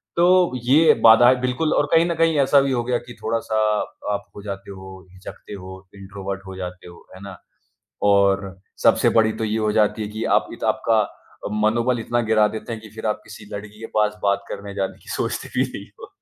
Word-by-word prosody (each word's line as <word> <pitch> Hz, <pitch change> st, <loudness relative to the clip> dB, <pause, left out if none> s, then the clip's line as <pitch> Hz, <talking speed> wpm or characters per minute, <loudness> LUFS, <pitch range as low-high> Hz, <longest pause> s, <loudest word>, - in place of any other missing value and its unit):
तो 180 Hz, -1 st, +4 dB
ये 150 Hz, +6 st, +5 dB
बाधाएँ 120 Hz, +3 st, +7 dB
बिल्कुल 130 Hz, +5 st, 0 dB
और 145 Hz, -, +2 dB
कहीं 165 Hz, +1 st, +5 dB
न 170 Hz, -1 st, -1 dB
कहीं 165 Hz, -1 st, +2 dB
ऐसा 140 Hz, +1 st, +5 dB
भी 135 Hz, -1 st, -1 dB
हो 120 Hz, -2 st, 0 dB
गया 125 Hz, 0 st, 0 dB
कि 120 Hz, -, -9 dB
थोड़ा-सा 110 Hz, -1 st, -1 dB, 0.6 s
आप 100 Hz, -, -4 dB
हो 100 Hz, -, -9 dB
जाते 100 Hz, -1 st, -7 dB
हो, 95 Hz, 0 st, -11 dB
हिचकते 95 Hz, +2 st, -11 dB
हो, 95 Hz, -1 st, -10 dB
इंट्रोवर्ट 100 Hz, 0 st, -7 dB
हो 95 Hz, -, -8 dB
जाते 90 Hz, -1 st, -7 dB
हो, 85 Hz, -, -15 dB
है 95 Hz, -, -13 dB
ना? 100 Hz, -2 st, -9 dB, 0.6 s
और 100 Hz, -1 st, +2 dB, 0.2 s
सबसे -, -, +4 dB
बड़ी 110 Hz, -1 st, +3 dB
तो -, -, -5 dB
ये 110 Hz, 0 st, -1 dB
हो 110 Hz, -1 st, 0 dB
जाती 105 Hz, 0 st, +1 dB
है 105 Hz, -, -3 dB
कि 110 Hz, +1 st, -4 dB
आप -, -, -2 dB
इत -, -, -10 dB
आपका -, -, +2 dB, 0.5 s
अ, -, -, -3 dB
मनोबल 115 Hz, +3 st, +1 dB
इतना 120 Hz, +2 st, -1 dB
गिरा 110 Hz, -1 st, +3 dB
देते 110 Hz, +2 st, -6 dB
हैं 110 Hz, -, -7 dB
कि 110 Hz, -, -12 dB
फिर 110 Hz, -, -7 dB
आप 105 Hz, 0 st, -2 dB
किसी 105 Hz, -, -12 dB
लड़की 105 Hz, +1 st, -8 dB
के 115 Hz, -, -7 dB
पास 105 Hz, 0 st, +1 dB
बात 100 Hz, 0 st, +1 dB
करने 100 Hz, 0 st, -7 dB
जाने 95 Hz, -1 st, -3 dB
की -, -, -15 dB
सोचते -, -, -3 dB
भी -, -, +3 dB
नहीं -, -, -8 dB
हो। -, -, -11 dB
105 Hz, 220 wpm, -22 LUFS, 100-120 Hz, 0.6 s, बाधाएँ